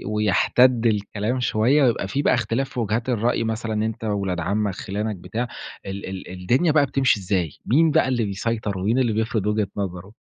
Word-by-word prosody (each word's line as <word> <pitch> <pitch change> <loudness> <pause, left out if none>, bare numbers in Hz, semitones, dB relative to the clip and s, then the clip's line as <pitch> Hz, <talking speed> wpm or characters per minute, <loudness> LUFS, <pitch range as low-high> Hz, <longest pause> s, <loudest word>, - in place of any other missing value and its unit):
ويَحتَدّ 115 +4 +3
الكلام 105 +3 0
شوية، 125 +5 +3
ويبقى 115 -6 +1
في 140 +8 -1
بقى - - +3
إختلاف 125 +2 -1
في 125 - -5
وجهات 115 +3 -1
الرأي 115 0 +1
مثلًا 110 0 -2
أنت 110 0 -4
وولاد 100 -4 -1
عمّك 100 +2 -1
خِلانك 105 +2 -3
بتاع، 105 +7 -4 0.4
ال 100 +1 -5
ال 95 -1 -7
الدنيا 120 - +1
بقى 145 -2 +4
بتمشي 135 -5 +2
إزاي؟ 90 -4 0 0.2
مين 155 +5 +4
بقى - - +3
اللي 120 -4 0
بيسيطر، 100 0 -2
ومين 110 +7 +1
اللي 120 -4 +1
بيفرض 110 -1 -1
وجهة 105 -1 +1
نظره؟ 95 0 -4
110 Hz, 180 wpm, -23 LUFS, 100-120 Hz, 0.4 s, بقى